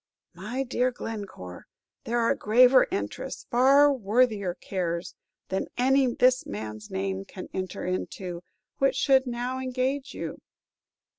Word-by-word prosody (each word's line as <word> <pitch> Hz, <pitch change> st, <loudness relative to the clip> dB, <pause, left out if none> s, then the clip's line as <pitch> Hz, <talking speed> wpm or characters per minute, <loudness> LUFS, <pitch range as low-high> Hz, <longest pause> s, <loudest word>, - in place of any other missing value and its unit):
"My 215 Hz, +10 st, -4 dB
dear 250 Hz, 0 st, +1 dB
Glencore, 200 Hz, -, -7 dB, 0.4 s
there 235 Hz, +1 st, -1 dB
are 230 Hz, -1 st, +3 dB
graver 250 Hz, +4 st, +5 dB
interests, 100 Hz, +1 st, -4 dB
far 275 Hz, +4 st, +6 dB
worthier 215 Hz, -5 st, +1 dB
cares, 175 Hz, -3 st, -3 dB, 0.4 s
than 190 Hz, -, -2 dB
any 260 Hz, 0 st, +3 dB
this 255 Hz, +1 st, +4 dB
man's 105 Hz, +1 st, -6 dB
name 95 Hz, 0 st, -3 dB
can 185 Hz, -, -10 dB
enter 185 Hz, -1 st, -4 dB
into, 180 Hz, -1 st, -4 dB, 0.4 s
which 270 Hz, -1 st, +3 dB
should 265 Hz, -1 st, +3 dB
now 245 Hz, +2 st, -3 dB
engage 260 Hz, +2 st, -2 dB
you." -, -, -6 dB
235 Hz, 125 wpm, -27 LUFS, 180-255 Hz, 0.4 s, far